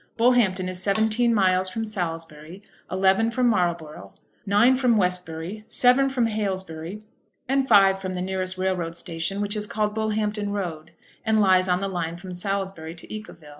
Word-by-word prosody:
Bullhampton 225 -6 +3
is 185 0 -4
seventeen 220 +4 +2
miles 185 -3 +2
from 225 +4 -3
Salisbury, 165 -3 -5 0.3
eleven 190 +4 +3
from 250 +2 0
Marlborough, 170 - -1 0.3
nine 215 +6 +5
from 250 -3 +2
Westbury, 180 +1 -2
seven 260 +2 +4
from 255 -3 +1
Haylesbury, 190 -3 -4 0.4
and 270 +1 +1
five 195 -3 +5
from 185 -1 -4
the 180 - -3
nearest 185 0 -2
railroad 185 -3 -2
station, 170 +3 -3
which 205 +1 -1
is 210 0 -2
called 210 -2 -1
Bullhampton 215 -1 -1
Road, 165 -6 -4 0.3
and 220 -1 +2
lies 185 -2 +4
on 180 +1 +1
the 195 - -1
line 170 -3 -3
from 185 +1 -9
Salisbury 190 -3 -4
to 170 - -10
Yeovil. 170 -8 -9
190 Hz, 160 wpm, -24 LUFS, 180-215 Hz, 0.4 s, nine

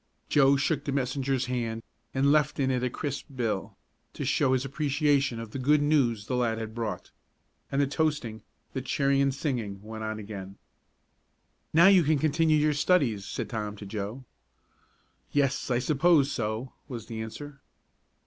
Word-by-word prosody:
Joe 140 -1 +5
shook 145 +1 0
the 140 - -1
messenger's 135 0 0
hand 115 -3 -3 0.3
and 135 +1 +2
left 150 0 +2
in 135 -1 +2
it 125 -1 0
a 125 - 0
crisp 145 +3 -4
bill, 115 -6 -2 0.4
to - - -4
show 130 - +2
his 130 +1 0
appreciation 140 -3 +1
of 115 -2 -7
the 135 - -5
good 145 +4 +4
news 125 -8 +2
the 125 - -2
lad 120 -2 +1
had 110 -1 -5
brought. 115 -2 -4 0.6
And 140 - 0
the 140 - +4
toasting, 145 -6 -1 0.3
the 130 - -2
cheering 140 +1 +1
and 140 0 +3
singing 125 -8 -3
went 110 0 -7
on 110 0 -3
again. 100 -2 -8 1.1
"Now 165 +2 +6
you 195 -2 +7
can 155 -1 +2
continue 155 +1 +2
your 150 0 +3
studies," 140 - +2
said - - -4
Tom 105 -2 -4
to 105 - -9
Joe. 105 +5 -5 1.1
"Yes, 140 -2 +1
I 125 - +2
suppose 145 +2 +3
so," 115 +2 -3
was 120 -5 -6
the 110 -1 -6
answer. 140 +5 -8
130 Hz, 170 wpm, -28 LUFS, 115-145 Hz, 1.1 s, you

